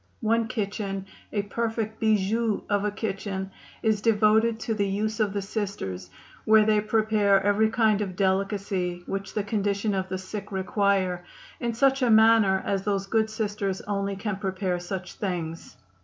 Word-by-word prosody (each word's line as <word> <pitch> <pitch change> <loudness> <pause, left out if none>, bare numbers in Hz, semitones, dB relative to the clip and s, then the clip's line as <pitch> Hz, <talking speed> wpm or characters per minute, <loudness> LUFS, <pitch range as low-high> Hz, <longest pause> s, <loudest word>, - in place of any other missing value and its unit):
One 230 0 +2
kitchen, 200 -4 -3 0.3
a 205 -2 -1
perfect 220 0 -3
'bijou' 220 +1 +1
of 205 0 +2
a - - +2
kitchen, 195 -2 -4 0.3
is 215 -2 +2
devoted 220 +1 +3
to 225 - -1
the 200 -2 0
use 210 +3 -2
of 210 -2 +2
the 200 -1 -2
Sisters, 190 - -4 0.3
where 215 0 +5
they 215 -1 +3
prepare 215 -2 +3
every 205 +2 +3
kind 220 -2 +2
of 190 -3 -3
delicacy 190 -2 -1
which 195 0 -5
the 210 - 0
condition 205 0 0
of 190 -1 -2
the 185 - -2
sick 195 +3 -7
require, 190 -2 0 0.4
in 235 -2 -2
such 270 +2 +3
a 250 - +3
manner 220 -3 +5
as 195 -1 0
those 195 -1 -1
good 220 +2 +1
Sisters 205 -3 -2
only 200 -1 -2
can 205 0 -3
prepare 190 -2 -2
such 180 +1 -5
things. 170 -4 -5
205 Hz, 160 wpm, -26 LUFS, 195-220 Hz, 0.4 s, where